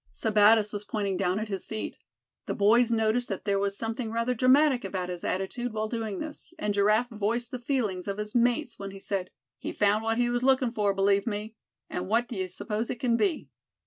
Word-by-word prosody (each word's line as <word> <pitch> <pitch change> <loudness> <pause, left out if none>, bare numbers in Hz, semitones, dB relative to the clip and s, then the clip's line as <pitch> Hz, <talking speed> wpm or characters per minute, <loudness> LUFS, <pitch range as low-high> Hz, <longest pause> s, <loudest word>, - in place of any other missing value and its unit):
Sebattis 215 0 +4
was 205 0 -4
pointing 200 -2 -2
down 185 0 0
at 215 +1 -2
his 195 -3 -5
feet. 220 -1 -4 0.5
The - - -2
boys 230 +4 +4
noticed 225 +2 +1
that 195 -1 -4
there 200 -1 +1
was 200 0 -1
something 225 +1 -3
rather 230 +2 0
dramatic 255 +2 +4
about 185 -2 -3
his 175 -1 -6
attitude 230 +6 -2
while 215 0 -1
doing 220 -3 -3
this; 310 +3 -8
and 210 -8 -1
Giraffe 215 +4 +3
voiced 225 +3 -1
the 250 - -4
feelings 230 -8 -1
of 200 0 -2
his 210 0 -5
mates 245 +2 +1
when 200 0 -5
he 195 0 -10
said: 190 -2 -3 0.3
"He - - -4
found 210 +1 +2
what 225 0 0
he 240 0 +2
was 245 0 0
looking 260 -2 +3
for, 205 -3 +1
believe 200 +2 +2
me; 210 0 -3 0.3
and 180 +1 -4
what 230 +4 +2
d'ye 190 -5 -3
suppose 210 +4 -3
it 245 - -3
c'n 235 -2 +2
be?" 340 - 0
215 Hz, 210 wpm, -28 LUFS, 200-240 Hz, 0.5 s, Sebattis